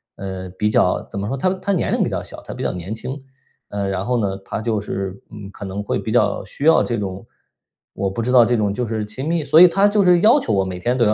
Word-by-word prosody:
呃， 95 -1 -6
比 105 +3 -1
较， - - +2
怎 100 - -5
么 100 - -3
说， 135 - -2
她 160 +8 +1
她 200 +2 -2
年 180 - 0
龄 - - +1
比 - - -1
较 - - -3
小， - - -11
她 - - -8
比 - - -6
较 - - 0
年 90 +4 -6
轻。 130 +5 -6 0.5
呃， 100 -1 -2
然 95 0 -2
后 125 -1 0
呢， 100 -3 -1
她 110 - -4
就 110 -2 -1
是， 95 -1 -5
嗯， 105 -2 -9
可 100 - -9
能 100 +2 -4
会 - - -1
比 - - -4
较 - - +1
需 - - -9
要 160 - +6
这 120 - -2
种， 95 -2 -5 0.7
我 95 0 -2
不 105 +5 -4
知 125 +2 -1
道 120 -3 +7
这 120 +1 +1
种 105 -3 +1
就 125 +3 -2
是 110 -1 -2
亲 120 +8 -6
密？ 165 -1 0
所 155 +3 +5
以 180 - +10
她 195 +4 +3
就 205 0 +2
是 180 -1 +5
要 235 +7 +6
求 110 - -2
我 95 -1 +2
每 95 -1 -5
天 120 +7 0
都 120 - +3
要 105 - +3
110 Hz, 305 characters per minute, -20 LUFS, 100-135 Hz, 0.7 s, 以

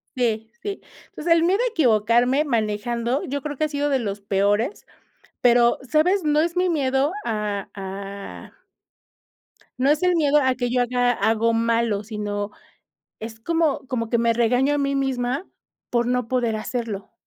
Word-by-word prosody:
sí, 225 -3 -1
sí, 405 -1 -5 0.3
entonces, 335 +2 +1
el 330 0 +3
miedo 370 +4 +2
a - - +2
equivocarme 245 - +3
manejando, 235 0 -1
yo 280 +1 -3
creo 290 +1 -5
que 310 - -1
ha - - -3
sido 290 0 -1
de 270 -2 +2
los 205 -3 -3
peores, 205 - 0 0.6
pero, 240 -1 +4
¿sabes?, 315 +8 +2
no 300 0 +3
es 335 +2 -1
mi 365 0 +2
miedo 275 -1 +1
a 210 -3 -2
a 195 0 -8 1.3
no 260 +2 +2
es 300 +3 +2
el 360 -1 +3
miedo 300 -3 +3
a 260 -1 +2
que 245 0 -2
yo 250 +1 +1
haga 245 0 +1
algo 225 0 +1
malo, 230 -2 +1
sino 205 -1 -4 0.7
es 225 0 -8
como 325 +3 0
como 230 -3 -2
que 235 - +2
me 230 0 +2
regaño 245 +4 +2
a - - +1
mí 280 -1 0
misma 265 +3 -1 0.4
por 240 -1 +1
no 250 -1 0
poder 240 -2 0
hacerlo 215 -3 -4
245 Hz, 165 wpm, -23 LUFS, 220-285 Hz, 1.3 s, pero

